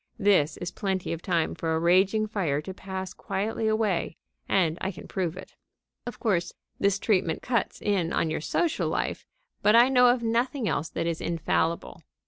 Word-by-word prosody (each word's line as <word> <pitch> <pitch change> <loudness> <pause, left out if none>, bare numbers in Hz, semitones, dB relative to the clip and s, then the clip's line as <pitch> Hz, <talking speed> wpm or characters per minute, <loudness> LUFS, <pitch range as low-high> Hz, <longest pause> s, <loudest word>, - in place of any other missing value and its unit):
This 195 -8 +3
is 175 - -5
plenty 190 -3 -2
of 165 - -6
time 170 -4 0
for 160 -1 -1
a - - +1
raging 190 +5 +3
fire 185 -10 -1
to 190 +5 -7
pass 190 0 -6
quietly 220 +3 -2
away, 215 -6 0 0.3
and 170 -4 +2
I 190 - -1
can 175 - -11
prove 180 -3 -2
it. 190 - -10 0.5
Of 240 - -6
course 185 -6 0 0.3
this 200 0 +2
treatment 185 -6 0
cuts 235 -4 -1
in 185 -5 0
on 160 - 0
your 160 - -2
social 325 - 0
life, - - -2 0.3
but 210 +2 +5
I 240 +2 +7
know 250 -2 +6
of 245 0 +3
nothing 235 +2 0
else 155 -2 -1
that - - -3
is 165 -1 -2
infallible. 165 0 -1
190 Hz, 180 wpm, -27 LUFS, 170-215 Hz, 0.5 s, I